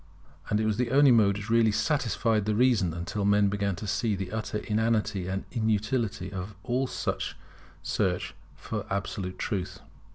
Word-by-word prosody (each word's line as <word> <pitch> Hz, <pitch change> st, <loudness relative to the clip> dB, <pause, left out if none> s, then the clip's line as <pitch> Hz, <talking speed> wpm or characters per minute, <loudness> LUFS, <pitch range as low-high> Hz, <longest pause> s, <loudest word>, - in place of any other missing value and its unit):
And 105 Hz, -, +2 dB
it 110 Hz, -, +1 dB
was 110 Hz, -1 st, +1 dB
the 125 Hz, -1 st, 0 dB
only 140 Hz, +1 st, +6 dB
mode 105 Hz, -4 st, +4 dB
which 105 Hz, +2 st, -6 dB
really 115 Hz, -1 st, +5 dB
satisfied 115 Hz, -3 st, +1 dB
the 105 Hz, 0 st, +1 dB
reason, 115 Hz, -7 st, +3 dB
until 85 Hz, +5 st, -3 dB
men 100 Hz, 0 st, +4 dB
began 100 Hz, -1 st, -1 dB
to 95 Hz, -, -7 dB
see 105 Hz, +1 st, 0 dB
the 95 Hz, -1 st, -5 dB
utter 110 Hz, -1 st, -3 dB
inanity 105 Hz, -3 st, 0 dB
and 95 Hz, +1 st, -3 dB
inutility 110 Hz, -3 st, -1 dB
of 95 Hz, +2 st, -5 dB
all 130 Hz, +1 st, 0 dB
search -, -, -3 dB, 1.2 s
for 105 Hz, -3 st, -5 dB
absolute 100 Hz, -2 st, -3 dB
truth. 95 Hz, -5 st, -3 dB
105 Hz, 160 wpm, -28 LUFS, 100-115 Hz, 1.2 s, only